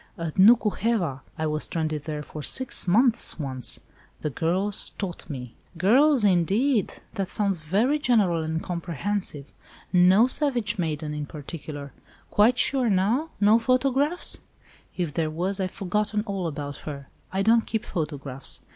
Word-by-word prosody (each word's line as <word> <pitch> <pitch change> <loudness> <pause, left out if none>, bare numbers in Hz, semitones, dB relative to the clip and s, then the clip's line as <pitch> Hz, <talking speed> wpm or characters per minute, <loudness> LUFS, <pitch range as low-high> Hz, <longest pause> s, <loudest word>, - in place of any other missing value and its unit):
"At 165 -2 -4
Nuku 215 +2 +6
heva! 185 - -1 0.2
I 160 - -2
was 155 0 0
stranded 155 -3 -3
there 150 -1 -4
for 150 - -8
six 260 - +2
months 230 +6 +3
once. 130 -5 -3 0.4
The 150 - -2
girls 185 +8 +2
taught 185 -4 -6
me." 125 -5 -7 0.2
"Girls, 255 - +4
indeed! 200 - +2 0.2
That 195 -1 -2
sounds 200 -3 0
very 210 - +1
general 205 - +2
and 160 +1 -3
comprehensive. 175 -3 -3 0.4
No 185 +5 +6
savage 245 -6 0
maiden 155 -2 -2
in 150 -1 -5
particular. 145 -1 -8 0.4
Quite 230 +4 +4
sure, 255 -2 +3
now? 215 +11 +1
No 210 +3 +5
photograph?" 270 +6 0 0.6
"If 170 -5 -2
there 160 0 -1
was, 180 +5 -2
I've 185 -1 -1
forgotten 210 +3 -2
all 195 -4 -3
about 145 -2 -5
her. 140 -3 -8 0.2
I 190 +1 0
don't 225 +2 +3
keep 220 -1 -2
photographs. 145 -5 -3
185 Hz, 145 wpm, -25 LUFS, 155-225 Hz, 0.6 s, Nuku